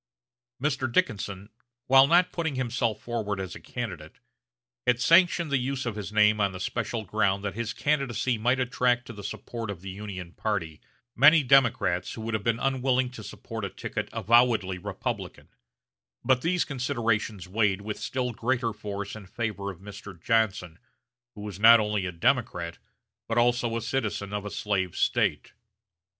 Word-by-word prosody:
Mr. 135 -2 -1
Dickinson, 100 -3 -1 0.4
while 135 +1 +7
not 175 +3 +4
putting 160 -4 -2
himself 120 -3 -1
forward 110 -4 -3
as 95 -1 -5
a - - -9
candidate, 90 -11 -7 0.7
had 125 -1 +3
sanctioned 170 +2 +4
the 140 - +3
use 130 +1 -2
of 115 -3 -3
his 105 -2 -6
name 105 0 +4
on 100 -1 +1
the 90 - -7
special 110 +2 -3
ground 100 0 +1
that 100 - -3
his 115 +1 -3
candidacy 135 -4 0
might 125 +4 +2
attract 125 -1 +1
to 120 - -9
the 105 -2 -10
support 110 +2 -6
of 95 -4 -5
the 95 0 -6
Union 95 -3 -7
party 90 -7 -3 0.3
many 150 +4 +7
Democrats 120 -9 +3
who 115 - -7
would 115 +1 -4
have 110 -2 -1
been 115 +1 +1
unwilling 130 -1 +1
to 115 -3 -9
support 110 +1 -7
a 100 - -2
ticket - - -5
avowedly 115 -5 +3
Republican; - - -5 0.8
but 130 -1 +3
these 175 +3 +1
considerations 115 - -1
weighed 100 0 +1
with 105 0 -5
still 125 -2 -2
greater 120 0 -1
force 100 -1 -6
in 105 -3 -10
favor 100 -2 -3
of 95 -2 -9
Mr. 100 -2 -10
Johnson, 100 -5 0 0.6
who 105 - -9
was 105 -2 -7
not 115 +2 +8
only 105 -3 -1
a - - -3
Democrat, 85 -3 0 0.5
but 115 - -2
also 120 -1 +2
a - - -3
citizen 105 -5 -2
of 105 0 -3
a - - -3
slave 95 -4 -2
State. - - 0
110 Hz, 165 wpm, -27 LUFS, 100-125 Hz, 0.8 s, not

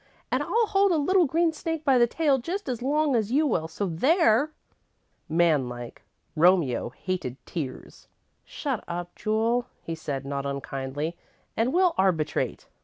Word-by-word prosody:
And - - +1
I'll 465 0 +2
hold 400 -2 +3
a 335 - +3
little 360 +5 +3
green 330 +3 +2
snake 325 0 -4
by 265 -3 +5
the 240 - +5
tail 285 0 +2
just 365 +11 -4
as 245 -3 -3
long 290 +1 +1
as 220 -1 0
you 295 +4 +3
will, 170 - 0
so 200 +5 -3
there!" 260 - +3 0.8
Man 160 -5 +3
like, 120 -1 -8 0.3
Romeo 165 -8 +3
hated 135 -2 -4
tears. 145 -7 -7 0.4
"Shut 270 -7 -4
up, 175 0 -5
Jule," 230 +3 0 0.2
he 165 - -4
said, 140 -4 -4
not 140 0 -3
unkindly, 140 +3 -4 0.4
"and 230 +3 +1
we'll 360 +1 +3
arbitrate." 180 -5 0
220 Hz, 155 wpm, -26 LUFS, -, 0.8 s, by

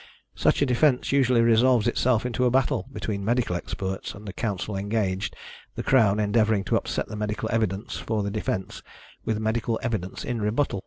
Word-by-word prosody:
Such - - +2
a - - +4
defence 125 +1 +2
usually 130 -3 +4
resolves 115 0 +4
itself 125 -2 +2
into 125 +1 0
a - - +4
battle 130 0 +1
between 100 -6 -4
medical 115 -3 +1
experts 95 +2 -4
and 105 +1 -11
the 100 - -5
counsel 105 -2 -3
engaged, 100 -1 -1 0.4
the - - -4
Crown 110 -6 +4
endeavouring 105 -1 +2
to - - 0
upset - - -1
the - - -7
medical 105 0 -2
evidence 105 -3 -1
for 110 -2 -2
the 100 - -2
defence 100 -2 -3 0.4
with 110 - 0
medical 110 +1 -1
evidence 100 -6 -3
in 120 -2 -2
rebuttal. 105 +1 0
110 Hz, 175 wpm, -25 LUFS, 100-120 Hz, 0.4 s, a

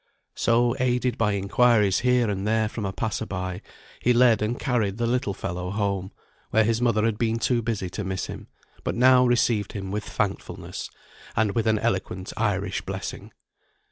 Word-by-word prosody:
So, 120 +1 +2
aided 125 -1 +1
by 105 -3 +1
inquiries 100 0 +3
here 125 -2 +3
and 100 0 -2
there 110 0 +2
from 105 -1 -5
a - - -2
passer 110 +2 -3
by, 90 -1 -4 0.4
he 125 - +3
led 120 -2 +5
and 110 +3 -1
carried 110 -6 0
the 120 - 0
little 115 -4 0
fellow 90 +1 -4
home, 100 -1 -2 0.4
where 110 - +4
his 115 +2 +1
mother 115 -3 +2
had 110 -2 0
been 115 -1 +1
too 120 +1 +1
busy 110 -5 -2
to 105 - -4
miss 95 -1 -3
him, - - -8 0.4
but - - -2
now 125 +1 +6
received 115 -4 +1
him 95 -2 -5
with 105 +1 -2
thankfulness, 100 -1 -4 0.5
and 110 -2 +2
with 115 -1 0
an 110 -1 +3
eloquent 95 -4 -2
Irish 100 -3 -1
blessing. 95 0 -6
110 Hz, 175 wpm, -25 LUFS, 100-120 Hz, 0.5 s, now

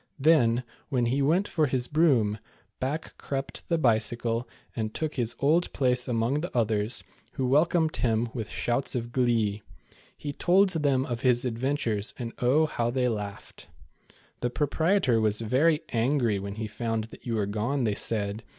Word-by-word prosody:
Then, 130 -5 +4 0.3
when 125 -4 +1
he 130 +4 +1
went 170 +9 +2
for 155 -3 +1
his 125 -2 -1
broom, 125 -10 +2 0.4
back 145 +5 -3
crept 135 -1 -5
the 170 - +2
Bicycle 115 -2 0 0.3
and 110 -2 -3
took 155 -1 -2
his 120 -2 -1
old 160 +5 +2
place 125 -2 +1
among 120 +4 0
the 175 - -3
others, 105 -2 +1 0.3
who 130 - -2
welcomed 155 +4 +2
him 115 -1 +1
with 110 -4 -4
shouts 120 +3 -1
of 120 -1 -3
glee. 115 -5 +1 0.6
He 145 -1 -5
told 190 +6 +4
them 145 -6 +1
of 120 -2 -4
his 125 -1 +3
adventures, 115 -3 -1
and 120 -2 -5
oh, 135 +6 +3
how 120 -6 -1
they 125 0 +1
laughed. 105 -3 -6 0.4
" - - -27
The 120 - 0
proprietor 150 - +1
was 105 -1 +1
very 145 +8 +2
angry 120 -3 +1
when 100 +1 -6
he 110 0 -4
found 110 +1 -2
that - - -12
you 115 - -1
were 105 -2 +1
gone," 115 +7 -1
they 110 -3 +1
said. 105 0 -2
125 Hz, 170 wpm, -27 LUFS, 115-145 Hz, 0.6 s, Then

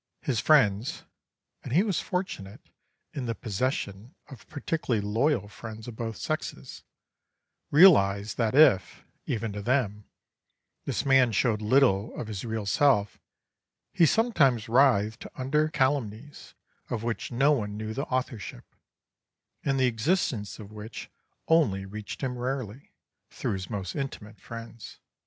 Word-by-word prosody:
His 125 -6 0
friends 115 -7 +3 0.6
(and - - -7
he 175 +7 +5
was 200 -6 0
fortunate 180 - -5 0.4
in 130 -4 -4
the 115 - -2
possession 110 - -3
of 135 -6 -13
particularly 145 -5 -2
loyal 110 +2 0
friends 110 +3 -9
of 120 - -7
both 115 -1 -5
sexes) 155 - -5 0.9
realised 105 - +5
that 115 0 0
if, 95 - +4 0.2
even 115 -3 -2
to 105 - -5
them, 105 -3 0 0.8
this - - -2
man 135 -3 +5
showed 110 0 +1
little 110 -3 +2
of - - -3
his 100 -3 -5
real 110 -3 -3
self, 105 -2 +2 0.7
he 170 -4 +5
sometimes 145 - +2
writhed 115 -3 +3
under 150 +4 +1
calumnies 135 -2 -2 0.3
of 115 -2 -3
which 120 +1 -3
no 135 +5 +3
one 105 -7 -1
knew 110 0 -4
the 140 +5 -3
authorship, 125 - -4 1.0
and 135 -1 0
the 130 - +4
existence 120 - 0
of 105 -2 -11
which 110 +1 -9 0.4
only 110 -13 +3
reached 105 +1 -8
him 125 -2 -3
rarely, 130 -1 -4 0.4
through - - -3
his 95 -2 -5
most 100 -4 -4
intimate 110 -7 -6
friends. 115 +1 -10
115 Hz, 135 wpm, -27 LUFS, 105-135 Hz, 1.0 s, he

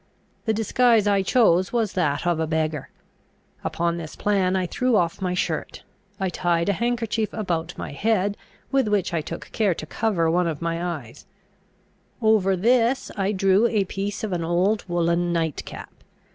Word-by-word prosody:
The 220 - +2
disguise 225 0 +3
I 200 -1 +3
chose 190 -4 +3
was 225 -4 0
that 150 -4 0
of 175 -2 +1
a 160 - 0
beggar. 155 -2 -1 0.7
Upon 170 0 -1
this 160 -2 -7
plan, 195 -3 +1
I 185 -1 +1
threw 250 +6 0
off 170 -3 +1
my 180 -1 -1
shirt; 165 -3 -3 0.4
I 190 - 0
tied 175 0 0
a - - +3
handkerchief 230 0 -1
about 175 -5 -3
my - - -5
head, 200 +4 +1 0.4
with 270 -4 +2
which 205 -4 0
I 165 - +1
took 165 +2 -8
care 205 -6 +1
to 155 - -6
cover 180 -1 0
one 175 +1 +2
of 160 -3 -3
my 170 0 -2
eyes; 155 -9 -6 0.9
over 215 -4 +3
this 235 +6 +2
I 195 0 0
drew 195 +2 +3
a 215 -4 +1
piece 200 +2 -4
of 210 -4 -2
an 170 -2 -1
old 180 +6 +1
woollen 175 0 +1
nightcap. 165 -3 -3
185 Hz, 170 wpm, -24 LUFS, 170-215 Hz, 0.9 s, disguise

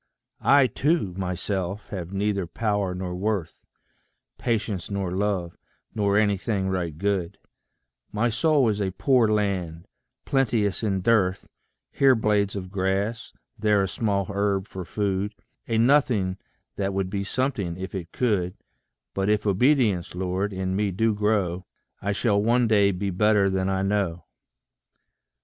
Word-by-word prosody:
I 140 -1 +5
TO 145 - 0
myself 95 +1 -3
have 90 -4 -5
neither 100 -2 -1
power 100 -1 -1
nor 90 -1 -4
worth, 95 -2 -3 0.8
Patience 110 -6 -2
nor 100 -3 -2
love, 95 -3 -1 0.4
nor 100 -2 +1
anything 100 -1 +1
right 85 -5 -2
good; 95 -2 -1 0.7
My 105 +3 +1
soul 140 +2 +3
is 105 -1 -1
a 95 -2 -1
poor 125 +2 +3
land, 95 -6 -1 0.4
plenteous 115 -8 +1
in 100 -4 0
dearth 95 -3 +2 0.4
Here 135 -2 +4
blades 105 -3 +1
of 95 -2 -6
grass, 100 +3 -1 0.3
there 105 -2 +3
a - - 0
small 100 -1 -1
herb 100 -1 0
for 95 -2 -7
food 100 +1 -2 0.3
A 115 - 0
nothing 115 -7 +3 0.4
that 100 -1 -1
would 95 -1 -1
be 100 -1 -2
something 100 -7 -2
if 95 0 -6
it 90 -4 -5
could; 100 -7 0 0.6
But 95 +1 0
if 105 0 +1
obedience, 105 - +2
Lord, 95 +2 -1
in 95 -1 -2
me 105 0 +1
do 110 +4 +1
grow, 100 -4 0 0.3
I 100 - -1
shall 100 -1 +1
one 120 +2 +3
day 100 -2 +4
be 100 +1 -2
better 100 +1 +3
than 95 0 0
I 95 0 0
know. 95 -4 -1
100 Hz, 140 wpm, -25 LUFS, 95-110 Hz, 0.8 s, I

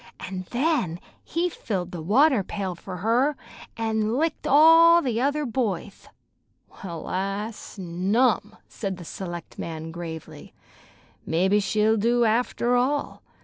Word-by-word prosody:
An' 185 -1 -6
then 245 - 0 0.2
he 340 +2 -1
filled 190 - -4
the 175 - -6
water 250 - +4
pail 190 -1 -4
fer 180 +2 -8
her, 235 - +1 0.4
an' 220 0 0
licked 315 +1 -1
all 330 +3 +7
the 245 -7 -1
other 290 +2 0
boyth." 215 -6 -3 0.8
"Well, 170 -4 -6
I 195 +4 -2
snum!" 205 +4 -1
said 195 -4 -5
the 175 - -10
selectman 165 -3 -6
gravely. 165 -2 -8 0.7
"Mebbe 190 +5 +2
she'll 215 +3 +2
do, 235 +3 +2
after 240 +2 +1
all. 275 +4 0
215 Hz, 120 wpm, -25 LUFS, 185-255 Hz, 0.8 s, all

